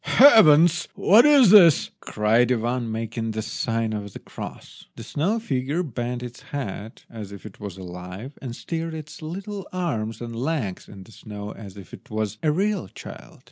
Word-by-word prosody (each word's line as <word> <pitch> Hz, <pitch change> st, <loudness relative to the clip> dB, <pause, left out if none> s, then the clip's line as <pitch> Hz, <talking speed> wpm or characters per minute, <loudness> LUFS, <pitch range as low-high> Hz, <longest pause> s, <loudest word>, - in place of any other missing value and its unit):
"Heavens! 170 Hz, -, +6 dB
what 225 Hz, +9 st, +6 dB
is 275 Hz, -9 st, +6 dB
this?" 175 Hz, -8 st, +7 dB
cried 115 Hz, +3 st, +1 dB
Ivan, 120 Hz, 0 st, -1 dB
making 115 Hz, 0 st, -4 dB
the 110 Hz, -, -1 dB
sign 115 Hz, -1 st, -2 dB
of 100 Hz, -2 st, -6 dB
the -, -, -7 dB
cross. -, -, -10 dB
The 115 Hz, -, -9 dB
snow 165 Hz, -, -1 dB
figure 145 Hz, -, -2 dB
bent 125 Hz, -3 st, -4 dB
its 125 Hz, 0 st, -9 dB
head 115 Hz, -5 st, -7 dB
as 105 Hz, -3 st, -9 dB
if 100 Hz, 0 st, -11 dB
it 110 Hz, -, -11 dB
was 100 Hz, -3 st, -7 dB
alive, 90 Hz, +7 st, -9 dB
and 120 Hz, -3 st, -6 dB
stirred 165 Hz, +2 st, -4 dB
its 155 Hz, 0 st, -9 dB
little 195 Hz, +5 st, -6 dB
arms 115 Hz, -, -3 dB
and 115 Hz, -1 st, -7 dB
legs 125 Hz, -, -3 dB
in 95 Hz, -2 st, -11 dB
the 105 Hz, -, -17 dB
snow 105 Hz, -1 st, -8 dB
as 100 Hz, -3 st, -11 dB
if 95 Hz, -, -13 dB
it -, -, -13 dB
was 110 Hz, 0 st, -3 dB
a 155 Hz, -, +2 dB
real 195 Hz, -, -1 dB
child. -, -, -12 dB
120 Hz, 180 wpm, -24 LUFS, 110-165 Hz, -, this